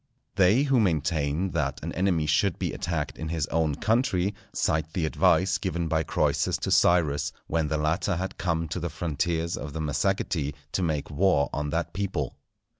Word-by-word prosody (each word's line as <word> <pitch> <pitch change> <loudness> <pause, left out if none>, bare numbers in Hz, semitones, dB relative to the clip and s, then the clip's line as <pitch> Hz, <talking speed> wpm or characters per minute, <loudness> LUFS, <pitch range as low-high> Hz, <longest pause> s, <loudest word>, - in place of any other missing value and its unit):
They 100 +7 +4
who 135 -3 +3
maintain 80 -2 0
that 75 -5 -1
an - - -4
enemy 90 -4 +1
should 80 +5 +2
be - - -2
attacked 85 -3 -3
in 80 - -4
his 80 -3 -1
own 80 -3 +1
country, 105 - +1 0.2
cite 80 0 0
the 85 -4 0
advice 95 +4 +3
given 85 -3 -2
by 80 0 +1
Croesus - - +1
to - - -3
Cyrus, 75 -5 +3
when 80 -1 0
the 80 - 0
latter 80 +5 0
had 95 +3 -4
come 85 -2 0
to 90 - -3
the 85 0 -3
frontiers 80 +1 -1
of 70 0 -6
the 80 - -4
Massagetæ 75 -1 -1 0.2
to - - -1
make 75 -4 -1
war 75 -3 +2
on 75 0 -2
that 85 +2 -2
people. 90 -9 -2
80 Hz, 180 wpm, -27 LUFS, 75-90 Hz, 0.2 s, They